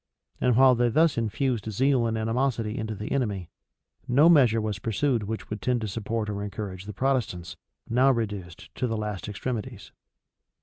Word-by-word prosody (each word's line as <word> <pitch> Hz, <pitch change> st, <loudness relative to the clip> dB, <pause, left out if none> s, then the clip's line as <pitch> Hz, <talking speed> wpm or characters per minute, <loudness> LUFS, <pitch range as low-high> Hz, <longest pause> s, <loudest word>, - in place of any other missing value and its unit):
[*] -, -, -37 dB
And 125 Hz, -2 st, +3 dB
while 130 Hz, +1 st, +7 dB
they 120 Hz, 0 st, +2 dB
thus 160 Hz, +5 st, +3 dB
infused 115 Hz, -1 st, -1 dB
zeal 130 Hz, +2 st, +2 dB
and 110 Hz, 0 st, -1 dB
animosity 115 Hz, -1 st, -1 dB
into 110 Hz, 0 st, -3 dB
the 105 Hz, +1 st, -6 dB
enemy, 105 Hz, -10 st, -1 dB, 0.6 s
no 145 Hz, +7 st, +5 dB
measure 125 Hz, -9 st, +5 dB
was 105 Hz, -3 st, -3 dB
pursued 115 Hz, +4 st, 0 dB
which 110 Hz, +2 st, -4 dB
could 105 Hz, -2 st, -6 dB
tend 125 Hz, +2 st, +1 dB
to 110 Hz, -, -2 dB
support 110 Hz, +2 st, -3 dB
or 100 Hz, -1 st, -3 dB
encourage 100 Hz, -2 st, -6 dB
the 105 Hz, -, -6 dB
Protestants, 105 Hz, -9 st, -1 dB, 0.3 s
now 125 Hz, +3 st, +4 dB
reduced 105 Hz, -8 st, -3 dB
to 125 Hz, -, -2 dB
the 115 Hz, -1 st, -2 dB
last 105 Hz, -2 st, -4 dB
extremities. 110 Hz, -1 st, -5 dB
110 Hz, 175 wpm, -26 LUFS, 105-125 Hz, 0.6 s, while